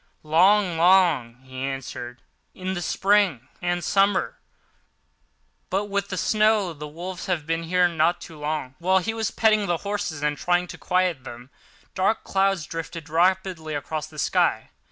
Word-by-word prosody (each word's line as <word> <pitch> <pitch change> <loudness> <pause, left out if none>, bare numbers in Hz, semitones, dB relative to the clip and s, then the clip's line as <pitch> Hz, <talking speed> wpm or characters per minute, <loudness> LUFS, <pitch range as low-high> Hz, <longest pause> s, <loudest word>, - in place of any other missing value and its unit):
"Long, 180 +3 +4
long," 170 -10 +4
he 130 0 -9
answered, 135 -2 -6 0.3
"in 185 0 -4
the 175 - -3
spring 195 - +1
and 175 0 -1
summer; 195 +2 +1 1.3
but 200 +2 -2
with 200 0 -1
the 190 - -4
snow 215 -2 +2
the 150 0 -8
wolves 175 +4 -7
have 175 -5 -1
been 165 +1 -1
here 180 +2 +2
not 170 +1 +1
so 160 -2 -11
long." 150 -3 -3
Whilst 185 +1 +2
he 225 - -1
was 225 -2 -1
petting 215 -2 +2
the 175 - +1
horses 200 -7 -3
and 150 0 0
trying 175 0 +1
to 180 - -8
quiet 180 -2 0
them, 120 +1 -10 0.4
dark 195 +4 +1
clouds 195 -4 +1
drifted 165 -1 -7
rapidly 175 -1 +1
across 155 +2 -4
the 155 -1 -15
sky. - - +1
175 Hz, 155 wpm, -24 LUFS, 155-190 Hz, 1.3 s, Long